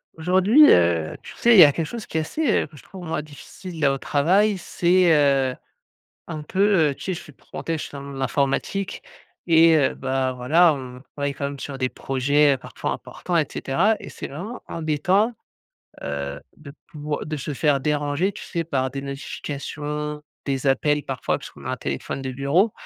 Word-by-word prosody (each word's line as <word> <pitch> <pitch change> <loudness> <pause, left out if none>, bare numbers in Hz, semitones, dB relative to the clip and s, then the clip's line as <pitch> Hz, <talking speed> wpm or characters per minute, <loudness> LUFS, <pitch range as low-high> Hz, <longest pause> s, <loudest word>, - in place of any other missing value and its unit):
Aujourd'hui, 190 - +5
heu, 85 -2 +3
tu - - -11
sais, 235 -1 +5
il - - +8
y - - +13
a 145 - +7
quelque 165 +3 -2
chose 225 +6 -7
qui - - -4
est - - +2
assez, 300 - -2 0.2
heu, - - -8
que 155 - -18
je - - -15
trouve 185 -2 -10
moi, 160 -2 -2
difficile 155 +2 -7
au 135 0 +1
travail 190 +10 +2
c'est, 175 0 +2
heu, 135 -3 +3 0.7
un 155 -2 -6
peu, 190 -1 +2
heu, - - -4
tu - - -11
sais, 190 - -1
je - - -7
suis, 150 - -13
entre - - -29
parenthèses, 165 -1 -3
je - - -4
suis - - -10
dans 140 - -7
le 140 - -9
monde 140 - -8
de 135 - -6
l'informatique 140 +9 -1 0.4
et 165 -1 +6
heu, 140 -3 +2
bah, 130 0 -1
voilà 155 +7 +4
on 125 -2 -8 0.2
travaille 140 -1 -2
quand 140 - -5
même 140 0 -8
sur 140 0 -6
des 130 -1 0
projets 140 +3 +2
parfois - - -5
importants 180 - -4
et 160 -3 +3
cetera 190 +11 +1
et - - -9
c'est - - -7
vraiment 195 - -7
embêtant, 180 +8 +1 0.7
heu, 70 0 -4 0.2
de 145 -2 -11 0.2
pouvoir 150 -2 -4
de 155 0 -4
se 145 +1 -4
faire 145 0 +2
déranger, 150 +5 0
tu 205 - -10
sais, 170 -3 -3
par 130 -5 -1
des 135 +1 -5
notifications, 150 +2 -5 0.2
des 135 -1 -1
appels 145 +2 +2
parfois 135 - -2
puisqu'on - - -12
a - - -3
un - - -3
téléphone 135 - -4
de 130 -1 -4
bureau, 140 - +2
150 Hz, 205 wpm, -23 LUFS, 135-170 Hz, 0.7 s, y